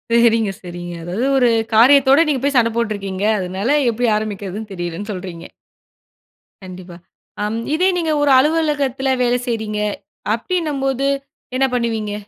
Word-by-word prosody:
சரிங்க, 230 Hz, -3 st, +3 dB
சரிங்க. 175 Hz, -1 st, -7 dB
அதாவது 185 Hz, +9 st, -2 dB
ஒரு 245 Hz, -2 st, +4 dB, 0.3 s
காரியத்தோட, 270 Hz, +4 st, +6 dB
நீங்க 280 Hz, -4 st, 0 dB
போய் 280 Hz, 0 st, 0 dB
சண்ட 230 Hz, -1 st, +4 dB
போட்டுருக்கீங்க. 200 Hz, -4 st, -2 dB
அதனால 195 Hz, +10 st, 0 dB
எப்படி 240 Hz, +2 st, -1 dB
ஆரம்பிக்கிறதுன்னு 210 Hz, 0 st, -5 dB
தெரியலன்னு 175 Hz, +3 st, -5 dB
சொல்றீங்க. 180 Hz, -3 st, -7 dB, 1.2 s
கண்டிப்பா. 180 Hz, -1 st, -10 dB, 0.5 s
ஆம் 220 Hz, +2 st, -2 dB, 0.2 s
இதே 365 Hz, +4 st, +3 dB
நீங்க 330 Hz, -2 st, 0 dB
ஒரு 290 Hz, -1 st, +3 dB
அலுவலகத்தில 285 Hz, -3 st, 0 dB
வேல 245 Hz, 0 st, +2 dB
செய்றீங்க? 215 Hz, -3 st, -2 dB, 0.5 s
அப்படின்னம்போது, 275 Hz, -2 st, -1 dB, 0.5 s
என்ன 265 Hz, +1 st, +3 dB
பண்ணுவீங்க? 225 Hz, -4 st, -1 dB
230 Hz, 120 wpm, -19 LUFS, 195-270 Hz, 1.2 s, காரியத்தோட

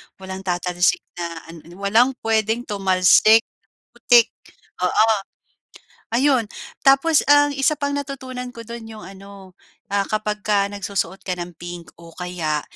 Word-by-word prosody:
Walang 190 Hz, 0 st, -8 dB
tatalsik 180 Hz, -1 st, 0 dB, 0.2 s
na 170 Hz, -1 st, -6 dB
an 165 Hz, -, -11 dB
ano, 175 Hz, -, -13 dB
walang 225 Hz, +6 st, +4 dB
puwedeng 225 Hz, +1 st, 0 dB
tumalsik 200 Hz, +2 st, +4 dB, 0.5 s
putik, 240 Hz, -1 st, +5 dB, 0.6 s
oo. 215 Hz, +5 st, +3 dB, 1.1 s
Ayun 260 Hz, -1 st, +3 dB, 0.4 s
tapos 275 Hz, +3 st, +4 dB
ang 290 Hz, 0 st, +5 dB
isa 275 Hz, +2 st, +1 dB
pang 285 Hz, -1 st, -2 dB
natutunan 260 Hz, -3 st, -6 dB
ko 230 Hz, -, -8 dB
do'n 235 Hz, -1 st, -8 dB
'yong 220 Hz, -1 st, -10 dB
ano, 195 Hz, -1 st, -13 dB, 0.4 s
ah, 200 Hz, 0 st, +1 dB
kapagka 210 Hz, -1 st, -1 dB
nagsusuot 195 Hz, -2 st, -4 dB
ka 185 Hz, -, -3 dB
ng 175 Hz, 0 st, -7 dB
pink 175 Hz, 0 st, -9 dB
o 170 Hz, 0 st, -13 dB
kaya 170 Hz, -4 st, -3 dB
205 Hz, 130 wpm, -21 LUFS, 180-240 Hz, 1.1 s, putik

